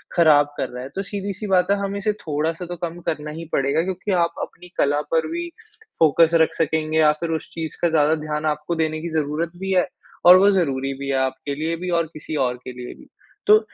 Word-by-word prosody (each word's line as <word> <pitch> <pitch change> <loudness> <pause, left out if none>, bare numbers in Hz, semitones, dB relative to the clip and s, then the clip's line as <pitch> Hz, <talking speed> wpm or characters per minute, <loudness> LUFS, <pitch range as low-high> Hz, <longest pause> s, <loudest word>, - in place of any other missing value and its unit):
ख़राब 150 -4 +6
कर - - -1
रहा 125 0 -7
है। 130 - -7
तो 195 - -1
सीधी-सी 200 +1 -5
बात 185 -1 +3
है, - - +5
हमें 200 0 -3
इसे 210 +2 +1
थोड़ा-सा 165 0 -3
तो 175 - -6
कम 170 0 -5
करना 150 -1 -2
ही 165 +2 -7
पड़ेगा, 140 +4 +2
क्योंकि 190 +2 -3
आप 170 -2 +2
अपनी 180 - -8
कला 145 +1 +2
पर 160 -1 +2
भी, 345 +1 -3 0.5
फ़ोकस 165 +1 +5
रख 160 - +3
सकेंगे 160 0 0
या 155 -1 +6
फिर 170 - -3
उस 160 - -6
चीज़ 160 -1 -5
का 170 - +3
ज़्यादा 155 0 +3
ध्यान 150 0 -3
आपको 150 +2 -1
देने 155 -1 -1
की 170 - -4
ज़रूरत 155 +2 -1
भी 190 0 -3
है 180 0 +3 0.4
और 180 +1 +10
वो 195 +2 +5
ज़रूरी 135 -7 0
भी 140 - -5
है, 135 - +1
आपके 130 +2 -2
लिए 160 +3 -2
भी 180 +1 -5
और 165 - -1
किसी 155 +1 -6
और 125 0 -2
के - - -6
लिए 125 0 -8
भी। - - -17 0.4
तो, 215 +1 +8
160 Hz, 230 wpm, -22 LUFS, 150-180 Hz, 0.5 s, और